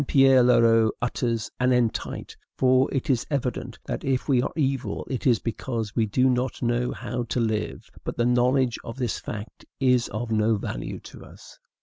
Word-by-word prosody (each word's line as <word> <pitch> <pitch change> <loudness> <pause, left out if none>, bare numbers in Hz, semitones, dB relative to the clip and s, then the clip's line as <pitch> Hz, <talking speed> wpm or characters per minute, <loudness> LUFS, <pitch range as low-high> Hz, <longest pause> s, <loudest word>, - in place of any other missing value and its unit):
Pierre 135 -2 +6
Leroux 115 -2 +5
utters 115 -2 -2
an 125 0 +3
entite; 120 -3 -1 0.2
for 130 0 +3
it 135 +3 -2
is 130 -5 +1
evident 135 -4 -3
that - - -4
if 130 -2 -1
we 130 -4 +3
are - - -2
evil 135 -8 -1
it 130 +1 -2
is 120 -3 +5
because 115 0 -4
we 115 -2 +2
do 125 +5 +2
not 125 0 0
know 120 +1 +1
how 120 +1 -4
to 120 +2 -2
live; 110 -2 -2 0.2
but - - -5
the 120 - +2
knowledge 125 0 +2
of 115 - -7
this 125 -6 -2
fact 105 +1 -8 0.2
is 125 -3 +3
of 115 +3 -4
no 110 +1 +3
value - - -5
to - - -12
us. - - -15
120 Hz, 185 wpm, -25 LUFS, 115-130 Hz, 0.2 s, Pierre